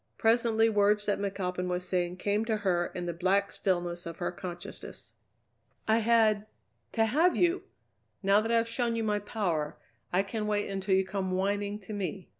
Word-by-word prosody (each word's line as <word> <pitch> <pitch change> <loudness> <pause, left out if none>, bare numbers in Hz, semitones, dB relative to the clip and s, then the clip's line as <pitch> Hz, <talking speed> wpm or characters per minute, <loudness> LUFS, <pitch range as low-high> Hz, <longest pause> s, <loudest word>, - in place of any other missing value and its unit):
Presently 225 0 +3
words 210 -1 +3
that 205 - 0
McAlpin 185 -2 -2
was 180 0 -2
saying 180 -1 -1
came 205 +3 0
to 220 -2 0
her 180 -4 +1
in 180 -1 -3
the 170 - -2
black 190 +4 +1
stillness 175 -2 -1
of 165 0 -7
her 175 - -2
consciousness. 175 -1 -8 0.7
"I 220 +1 +4
had 220 -2 +3 0.5
to 225 - +3
have 315 +11 +3
you! 350 +1 +2 0.6
Now 200 +2 +5
that 225 +1 -2
I've 230 0 +3
shown 235 0 0
you 225 - -1
my 210 -1 +1
power, 180 -8 -2 0.3
I 185 +2 +3
can 210 +1 -3
wait 205 -1 0
until 195 0 0
you 190 0 +2
come 190 -1 -2
whining 200 +2 0
to 215 - -8
me. 195 -2 -4
200 Hz, 180 wpm, -30 LUFS, 185-220 Hz, 0.7 s, Now